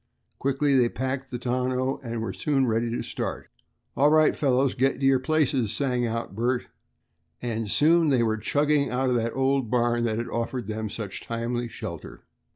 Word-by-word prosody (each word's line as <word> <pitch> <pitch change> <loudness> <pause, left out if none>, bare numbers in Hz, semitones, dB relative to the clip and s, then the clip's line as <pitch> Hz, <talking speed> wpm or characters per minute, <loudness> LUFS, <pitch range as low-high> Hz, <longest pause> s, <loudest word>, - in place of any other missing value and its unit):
Quickly 140 +1 +1
they 125 -2 +4
packed 130 +1 -3
the 125 - -4
tonneau, 130 +2 -1
and 115 -2 -4
were - - -3
soon 140 -3 +1
ready 115 0 0
to 115 - -3
start. - - -5 0.5
"All 145 +3 +4
right, 155 0 +4
fellows, 135 -1 +2
get 135 +1 +1
to 135 - 0
your 135 -1 +5
places," 135 -6 +1
sang 125 -4 0
out 115 -2 -4
Bert, 120 +4 0 0.7
and 115 -3 -3
soon 160 +6 +4
they 130 -4 +3
were 110 -1 +1
chugging 145 +4 +1
out 130 +1 0
of - - +2
the 115 -1 0
old 135 -2 0
barn 120 0 +1
that 110 -2 -1
had 120 - -3
offered 115 +1 -3
them 110 +1 -4
such 105 -2 -6
timely 120 +1 -3
shelter. - - -8
125 Hz, 180 wpm, -26 LUFS, 115-135 Hz, 0.7 s, your